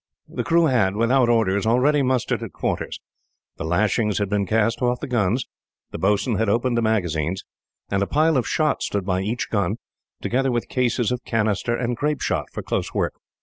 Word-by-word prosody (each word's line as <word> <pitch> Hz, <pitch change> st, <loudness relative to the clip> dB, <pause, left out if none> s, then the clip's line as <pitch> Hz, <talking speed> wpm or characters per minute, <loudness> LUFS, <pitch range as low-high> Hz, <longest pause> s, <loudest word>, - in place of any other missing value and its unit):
The -, -, -4 dB
crew 170 Hz, 0 st, +3 dB
had, 110 Hz, -9 st, +2 dB
without 120 Hz, +3 st, +3 dB
orders, 110 Hz, -3 st, +2 dB
already 135 Hz, +6 st, +3 dB
mustered 130 Hz, -2 st, 0 dB
at -, -, -7 dB
quarters. -, -, -3 dB, 0.6 s
The -, -, -5 dB
lashings 105 Hz, +5 st, +1 dB
had 100 Hz, -2 st, -1 dB
been 100 Hz, -1 st, 0 dB
cast 110 Hz, +3 st, +1 dB
off 125 Hz, 0 st, +1 dB
the -, -, -4 dB
guns, 120 Hz, 0 st, 0 dB, 0.5 s
the -, -, -6 dB
boatswain 105 Hz, +3 st, +1 dB
had 110 Hz, -2 st, +1 dB
opened 120 Hz, +3 st, +1 dB
the 115 Hz, -, +2 dB
magazines, 90 Hz, -6 st, 0 dB, 0.5 s
and 100 Hz, 0 st, +1 dB
a 100 Hz, -, +1 dB
pile 155 Hz, +2 st, +2 dB
of 130 Hz, -, +1 dB
shot 155 Hz, -1 st, +1 dB
stood 100 Hz, -2 st, -2 dB
by 95 Hz, -1 st, 0 dB
each 110 Hz, +5 st, -3 dB
gun, 100 Hz, -1 st, +1 dB, 0.4 s
together 135 Hz, +2 st, 0 dB
with 120 Hz, -1 st, -2 dB
cases 125 Hz, -2 st, +1 dB
of 125 Hz, 0 st, -3 dB
canister 110 Hz, +1 st, 0 dB
and 120 Hz, 0 st, -1 dB
grapeshot 150 Hz, +4 st, -1 dB
for -, -, -6 dB
close -, -, -3 dB
work. -, -, 0 dB
115 Hz, 190 wpm, -23 LUFS, 100-125 Hz, 0.6 s, crew